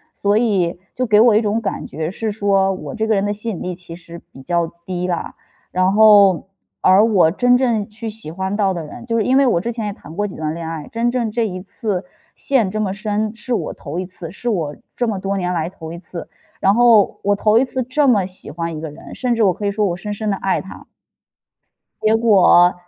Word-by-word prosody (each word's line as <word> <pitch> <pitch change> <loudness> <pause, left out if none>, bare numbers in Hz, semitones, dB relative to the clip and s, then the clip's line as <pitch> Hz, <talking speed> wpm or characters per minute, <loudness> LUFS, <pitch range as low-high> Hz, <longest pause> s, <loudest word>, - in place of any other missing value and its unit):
所 205 +1 +1
以 190 -7 +1 0.2
就 255 - 0
给 210 -2 +4
我 230 -3 +6
一 - - +6
种 215 +1 0
感 210 - -3
觉 160 +2 -4
是 220 +2 -3
说 195 -2 +2
我 215 - -7
这 220 0 -1
个 220 - +2
人 195 - +1
的 205 - 0
吸 210 +3 -4
引 180 - -6
力 180 - -3
其 170 -1 -11
实 170 -1 -11
比 135 - -12
较 170 +2 0 0.2
低 180 -1 -3
啦。 175 -2 -3 0.4
然 185 +1 +2
后 205 -4 +6 0.3
而 190 +4 +6
我 185 -8 +4
真 245 +5 +3
正 235 -5 +1
去 225 +1 -7
喜 215 -7 -9
欢 190 +3 -3
到 195 -2 +2
的 170 - -4
人 235 +11 -10
就 230 -1 -2
是 220 - +2
因 260 +1 +3
为 275 - +5
我 175 -8 +2
之 235 +5 -3
前 225 -2 -4
也 205 - -3
谈 160 - -13
过 205 0 -1
几 185 - -9
段 155 0 -3
恋 165 -1 -6
爱， 160 -2 -6
真 235 +1 0
正 240 -3 -1
这 230 0 0
一 185 -2 -6
次 200 -1 -4 0.3
陷 250 -8 +1
这 215 0 -2
么 195 -2 -1
深 210 0 -2
是 250 - -4
我 - - -2
头 160 +4 -6
一 185 - -3
次， 175 -3 -9
是 240 +4 -4
我 160 -8 -1 0.2
这 240 - 0
么 210 -3 -1
多 195 +1 -2
年 180 -1 -1
来 165 -1 -1
头 165 -3 -9
一 170 - -8
次。 170 -1 -8 0.3
然 195 +1 +3
后 230 -4 +4
我 205 0 +2
头 215 +2 +3
一 - - +3
次 255 0 -3
这 280 +4 +1
么 205 -7 +4
喜 185 0 -11
欢 165 0 -4
一 - - -7
个 160 - -5
人， 150 - -12
甚 245 -2 0
至 225 - +2
我 190 - +4
可 205 - -6
以 200 - +1
说 210 0 0
我 175 -3 0
深 205 +3 -5
深 215 +1 -3
地 - - 0
爱 190 0 0
他。 190 - -11 1.1
结 215 +1 +3
果， 190 -5 +5
200 Hz, 270 characters per minute, -19 LUFS, 180-225 Hz, 1.1 s, 我